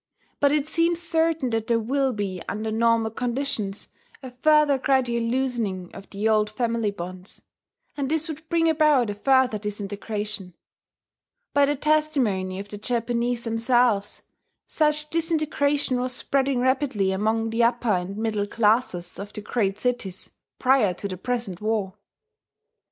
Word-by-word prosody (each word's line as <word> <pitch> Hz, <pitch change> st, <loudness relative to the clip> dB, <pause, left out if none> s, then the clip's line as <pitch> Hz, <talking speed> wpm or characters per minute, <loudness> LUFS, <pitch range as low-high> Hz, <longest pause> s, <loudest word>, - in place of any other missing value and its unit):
But 285 Hz, -1 st, +4 dB
it 295 Hz, -1 st, +1 dB
seems 335 Hz, +1 st, +1 dB
certain 325 Hz, -5 st, +1 dB
that 225 Hz, -1 st, -1 dB
there 235 Hz, -, +3 dB
will 265 Hz, +4 st, 0 dB
be, 200 Hz, -5 st, -4 dB
under 220 Hz, +1 st, -3 dB
normal 225 Hz, 0 st, +2 dB
conditions, 235 Hz, -4 st, -2 dB, 0.4 s
a 260 Hz, -, -7 dB
further 295 Hz, +2 st, +3 dB
gradual 255 Hz, -3 st, +1 dB
loosening 230 Hz, -7 st, -2 dB
of 195 Hz, -, -11 dB
the 205 Hz, +2 st, -2 dB
old 215 Hz, -1 st, +3 dB
family 230 Hz, -1 st, -1 dB
bonds; 185 Hz, -1 st, -9 dB, 0.5 s
and 275 Hz, -2 st, -2 dB
this 320 Hz, 0 st, +1 dB
would 315 Hz, 0 st, -8 dB
bring 330 Hz, -1 st, +2 dB
about 300 Hz, -8 st, +3 dB
a -, -, -3 dB
further 255 Hz, +1 st, +2 dB
disintegration. 205 Hz, -2 st, -5 dB, 1.0 s
By 285 Hz, 0 st, +5 dB
the 290 Hz, -, +1 dB
testimony 265 Hz, -11 st, +1 dB
of 200 Hz, +1 st, -7 dB
the 205 Hz, -, -7 dB
Japanese 235 Hz, +1 st, -1 dB
themselves, 230 Hz, -2 st, +1 dB, 0.4 s
such 300 Hz, -1 st, +1 dB
disintegration 300 Hz, -5 st, +1 dB
was 255 Hz, 0 st, 0 dB
spreading 270 Hz, -2 st, 0 dB
rapidly 260 Hz, -7 st, +1 dB
among 220 Hz, +3 st, 0 dB
the 230 Hz, +1 st, +2 dB
upper 235 Hz, 0 st, +1 dB
and 185 Hz, +2 st, -1 dB
middle 215 Hz, -2 st, -1 dB
classes 210 Hz, -5 st, +1 dB
of 200 Hz, +1 st, -7 dB
the 210 Hz, -, -6 dB
great 205 Hz, -2 st, -1 dB
cities, 240 Hz, -7 st, -2 dB, 0.3 s
prior 250 Hz, -8 st, +3 dB
to 200 Hz, -, -4 dB
the 185 Hz, -, -5 dB
present 230 Hz, -4 st, -3 dB
war. 210 Hz, -3 st, -1 dB
235 Hz, 145 wpm, -24 LUFS, 205-275 Hz, 1.0 s, By